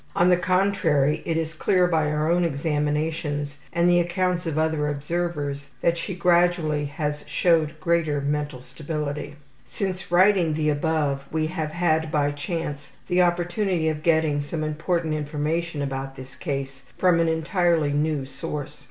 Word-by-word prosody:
On 175 +1 +4
the 180 - +6
contrary, 170 -5 +2
it 165 - 0
is 165 0 -2
clear 180 +3 +2
by 160 -3 +2
our 150 0 0
own 175 +2 +3
examinations 150 -1 -1
and 170 0 +2
the 175 0 +5
accounts 175 0 0
of 155 -2 -2
other 155 -1 +1
observers 145 -1 -3
that 170 - +3
she 170 +2 -4
gradually 170 -4 +2
has 150 0 -3
showed 160 -3 +2
greater 160 -3 +1
mental 145 -2 -2
stability. 150 0 -5 0.3
(Since 190 -2 -4
writing 180 -3 +4
the 155 -1 +1
above, 145 -2 0
we 155 0 0
have 155 -1 -3
had, 160 -1 +1
by 145 -2 +2
chance, 150 -1 -5 0.2
the 180 +1 +4
opportunity 175 0 +1
of 155 -1 -3
getting 160 -3 +2
some 155 +2 -4
important 160 +1 -1
information 150 +1 -2
about 135 -1 -4
this 130 0 -10
case 135 -3 -4 0.2
from 180 -2 +4
an 165 - +3
entirely 160 -2 +1
new 150 -1 0
source. 135 +2 -6
155 Hz, 150 wpm, -24 LUFS, 145-175 Hz, 0.3 s, the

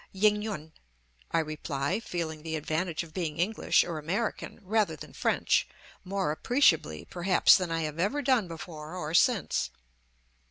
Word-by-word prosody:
"Ying 210 +2 +3
yun," 180 -8 -5 0.6
I - - 0
reply, 150 0 -1
feeling 165 -7 -4
the 160 0 -4
advantage 160 +2 -2
of 160 -2 -14
being 165 -5 -3
English 195 +6 +2
or 165 -3 -4
American, 195 +9 -3
rather 205 -4 +1
than - - -11
French, - - +1 0.4
more 190 -3 -1
appreciably 155 - +2
perhaps 180 +1 +4
than 180 -2 0
I 165 0 -1
have 155 0 -4
ever 260 +11 0
done 250 -7 +3
before 160 -1 -8
or 160 -3 -4
since. 215 - +2
170 Hz, 150 wpm, -29 LUFS, 155-200 Hz, 0.6 s, perhaps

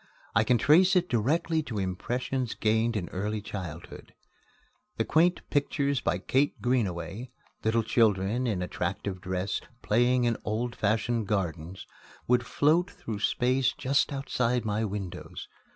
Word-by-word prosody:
I 105 - +4
can 120 +2 +3
trace 175 - +5
it 180 -1 +3
directly 155 +8 +1
to 115 -7 -6
impressions 120 +6 -2
gained 110 +2 +1
in 90 -4 -3
early 105 +3 -2
childhood. 95 -6 -8 0.8
The - - +1
quaint 175 +3 +2
pictures 140 -1 +1
by - - 0
Kate 135 +9 0
Greenaway 115 -1 -1 0.3
little 110 +1 +2
children 110 +1 +2
in 95 -6 -1
attractive 95 +1 -3
dress, 95 +2 -2 0.2
playing 120 +3 +3
in 120 -2 +1
old 120 +3 -2
fashioned 110 +1 0
gardens 90 -3 -3 0.4
would 125 0 +3
float 165 +6 +2
through 110 - -6
space 125 +4 +1
just 135 +1 +1
outside 125 -3 -1
my 105 +1 0
windows. 100 -3 -6
115 Hz, 135 wpm, -28 LUFS, 100-130 Hz, 0.8 s, trace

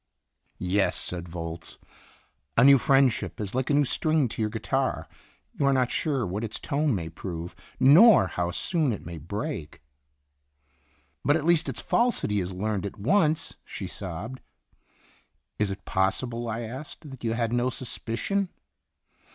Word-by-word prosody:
"Yes," 95 +2 +1
said 90 -1 -5
Volz, 85 -1 -6 0.8
"a 115 - +7
new 140 0 +8
friendship 135 -3 +2
is 105 -2 -4
like 130 0 -1
a - - +3
new 145 0 +4
string 155 +1 +2
to 110 - -5
your 105 - +1
guitar - - -1 0.5
you - - -2
are 140 - +4
not 130 -2 +2
sure 140 -7 0
what 100 +4 -3
its 110 - -4
tone 145 -3 0
may 85 -4 -3
prove, 85 +1 -6 0.2
nor 150 - +8
how 90 -1 -2
soon 150 - 0
it 105 - -7
may 85 -1 -7
break." 100 - -5 1.4
"But 145 - +4
at 160 -2 -1
least 170 -1 +3
its - - -5
falsity 235 - +1
is 90 0 -3
learned 100 +1 -2
at 100 - -10
once," 155 - +1
she - - -7
sobbed. 100 +8 -6 1.2
"Is 105 -2 +1
it 95 - -6
possible," 115 +5 -1
I 115 +1 -3
asked, 130 +7 -8
"that 135 - -11
you 115 -1 0
had 115 0 -1
no 120 +1 +2
suspicion 130 - -2
115 Hz, 155 wpm, -27 LUFS, 95-140 Hz, 1.4 s, new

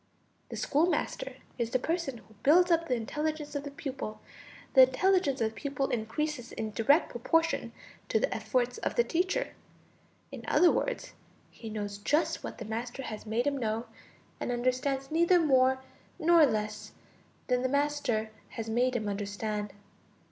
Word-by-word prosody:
The - - -6
schoolmaster 320 +5 0 0.2
is 235 -1 0
the 255 - +2
person 320 -1 -2
who 220 - -18
builds 350 +5 +5
up 335 0 +3
the 250 - +2
intelligence 300 +6 -3
of 285 - -2
the 285 - -5
pupil; 270 -6 -6 0.5
the 265 - +9
intelligence 280 +1 +3
of 220 - +2
the - - -21
pupil 280 0 -2
increases 245 +3 -2
in 220 -1 -4
direct 280 - +3
proportion 330 +8 +1 0.4
to - - +3
the - - 0
efforts 250 -1 -1
of - - -2
the 475 - +4
teacher; 375 +7 0 0.8
in - - -8
other 355 - +5
words, - - -2 0.4
he 225 - -9
knows 205 -1 -4
just 295 +10 +1
what - - -6
the - - -6
master 235 +4 -4
has 215 -2 -7
made 230 +4 0
him 285 -1 0
know 225 0 -1 0.5
and - - -2
understands 255 +3 -1
neither 340 +3 +4
more 265 -4 +4 0.4
nor 330 -1 +6
less 215 -2 -3 0.5
than 250 -1 +1
the 260 - 0
master 280 -6 0 0.2
has 225 -1 -6
made 245 +3 +1
him 215 -3 -1
understand. 205 +1 -3
260 Hz, 160 wpm, -30 LUFS, 225-305 Hz, 0.8 s, the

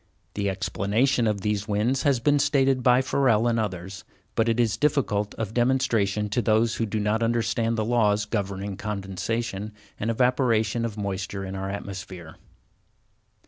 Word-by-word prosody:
The 100 -1 -1
explanation 100 +7 +1
of 105 -2 -1
these 105 +1 -1
winds 110 +6 +1
has 140 -4 +2
been 145 +4 +3
stated 135 -2 +2
by 125 +1 +4
Ferrel 120 -4 +2
and 115 -1 +1
others, 95 -2 -4 0.3
but 115 +1 +1
it 115 +1 +1
is 115 -4 +2
difficult 115 -7 0
of 110 -2 -4
demonstration 115 -5 +1
to 120 - 0
those 110 0 +2
who 115 - -1
do 110 +1 -2
not 105 +2 0
understand 115 0 0
the 110 - 0
laws 105 -3 +2
governing 100 -2 -3
condensation 105 +1 -3 0.3
and 110 - -1
evaporation 115 -2 +1
of 110 -2 -5
moisture 100 -1 -4
in 95 - -6
our 95 0 -4
atmosphere. 95 -4 -7
110 Hz, 155 wpm, -25 LUFS, 100-120 Hz, 0.3 s, by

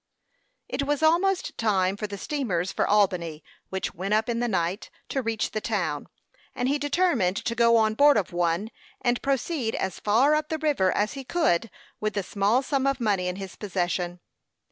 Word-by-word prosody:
It - - -2
was 290 +1 0
almost 360 +4 +2
time 195 -4 +2
for 210 +1 -4
the 200 0 -6
steamers 195 - -2
for - - 0
Albany, 180 -6 +1 0.3
which 190 0 -3
went 195 +4 -1
up 220 +2 +1
in 230 -1 0
the 240 - 0
night, 185 0 -1 0.2
to 270 - -1
reach 225 -2 -2
the 215 - -3
town, - - -2 0.5
and 245 - -1
he 285 +2 +1
determined 285 - +1
to 235 - 0
go 235 0 +4
on 220 -1 +3
board 285 +3 +5
of 190 -4 -1
one, 175 +5 0 0.3
and 245 -1 +1
proceed 275 -3 -1
as 190 - -3
far 240 +8 +3
up 305 0 0
the 315 - -1
river 290 -12 +2
as 210 +1 0
he 275 -1 -6
could 250 - +1 0.3
with 215 0 -2
the 200 - 0
small 205 +7 +1
sum 275 0 0
of 275 -1 0
money 200 -6 +1
in 180 - -2
his 195 -2 -7
possession. 180 -3 -2
220 Hz, 190 wpm, -26 LUFS, 190-275 Hz, 0.5 s, board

